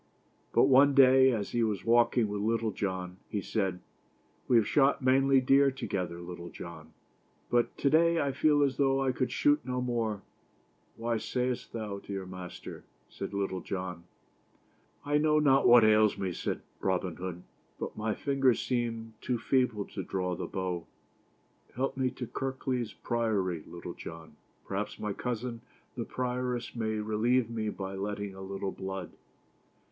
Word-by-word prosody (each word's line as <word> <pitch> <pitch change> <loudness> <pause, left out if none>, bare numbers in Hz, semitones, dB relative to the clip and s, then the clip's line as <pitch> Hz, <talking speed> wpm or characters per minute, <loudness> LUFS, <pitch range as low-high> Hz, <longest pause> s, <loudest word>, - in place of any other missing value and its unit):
But - - +5
one 140 +1 +6
day, 130 -1 +7
as 105 -4 -2
he 120 - +1
was 105 -4 -1
walking 120 0 +4
with 105 0 -3
Little 115 +1 0
John, 95 -3 -3
he 105 - -1
said: 95 -2 -2 0.7
"We 125 - +3
have 115 -2 +5
shot 140 -2 +3
many 135 +1 +5
deer 135 +2 +5
together, 95 -10 -3
Luctle 85 0 -8
John, 80 -2 -10 0.6
but 120 -1 +1
to - - 0
day 170 +1 +4
I 140 -2 +1
feel 145 +2 +3
as 135 -2 0
though 135 -1 +3
I 135 -1 +2
could 130 0 -1
shoot 145 +1 +3
no 125 0 -2
more." 115 -5 -1 0.7
"Why 115 0 -1
sayest 125 +2 -2
thou 105 -3 -4
so, - - -21
dear 95 -1 -4
master?" 90 -1 -8 0.3
said - - -6
Little 100 -2 -2
John. 90 -2 -5 1.0
"I 145 +1 +2
know 155 0 +3
not 140 -2 +4
what 120 -1 +8
ails 110 -1 +5
me," 95 -2 -2
said - - -3 0.2
Robin 95 -2 -1
Hood, 90 -1 -6 0.4
"but - - -5
my 110 -1 -1
fingers 135 -4 +2
seem 115 -2 -2
too 125 - -1
feeble 125 -5 +1
to - - -6
draw 90 -1 -2
the - - -4
bow. 90 -3 -3 0.9
Help 130 +3 -1
me 130 -1 +1
to 125 0 -6
Kirk 130 +3 -5
leys 125 -4 -1
Priory, 100 -9 -1
Little 85 0 -7
John, 80 -2 -10 0.3
perhaps 105 +2 -3
my 105 -1 -3
cousin, 120 +1 -4 0.3
the 120 -3 -3
Prioress, 125 -1 -3
may 110 -2 -1
relieve 110 +3 +1
me 110 -2 -2
by 95 -2 -5
letting 100 0 -4
a 95 - -10
little 95 0 -4
blood." 95 -1 -5
115 Hz, 160 wpm, -30 LUFS, 95-130 Hz, 1.0 s, what